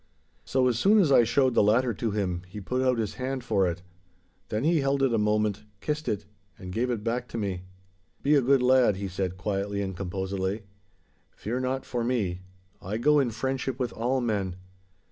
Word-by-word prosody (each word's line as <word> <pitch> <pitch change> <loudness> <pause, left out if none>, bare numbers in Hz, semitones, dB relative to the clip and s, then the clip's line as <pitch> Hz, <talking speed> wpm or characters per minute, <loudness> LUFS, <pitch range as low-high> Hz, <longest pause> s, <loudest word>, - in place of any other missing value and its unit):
So 130 -1 +2
as 120 -2 +1
soon 205 - +5
as 175 -9 +4
I 125 - +7
showed 130 +2 +2
the - - +4
latter 115 +4 +3
to 115 +2 -2
him 95 -4 -1
he 95 +3 -8
put 125 +6 -2
out 130 -1 +2
his 110 -3 -2
hand 130 0 -2
for 95 -6 +2
it. 85 0 -4 0.7
Then 110 +1 -1
he 160 0 +3
held 135 0 +1
it 130 -3 +3
a 115 - +2
moment, 105 -1 +1 0.2
kissed 150 +5 -3
it, 105 -1 -2 0.3
and 90 -1 -8
gave 120 +4 0
it 115 -4 -2
back 120 +2 -1
to 115 - -6
me. 95 -4 -3 0.6
'Be 145 - +3
a 145 - +5
good 130 +1 +3
lad,' 125 -4 +5
he 100 +1 -4
said 95 0 -3
quietly 100 +1 -2
and 95 -2 -3
composedly. 95 +2 -3 0.7
'Fear 120 +4 -3
not 130 +1 -2
for 120 -2 -2
me; 105 -8 -1 0.4
I 100 +4 -3
go 150 +5 +4
in 135 -4 +2
friendship 130 +2 -2
with 125 -2 -2
all 125 +3 0
men. 100 -6 -1
115 Hz, 200 wpm, -27 LUFS, 100-130 Hz, 0.7 s, I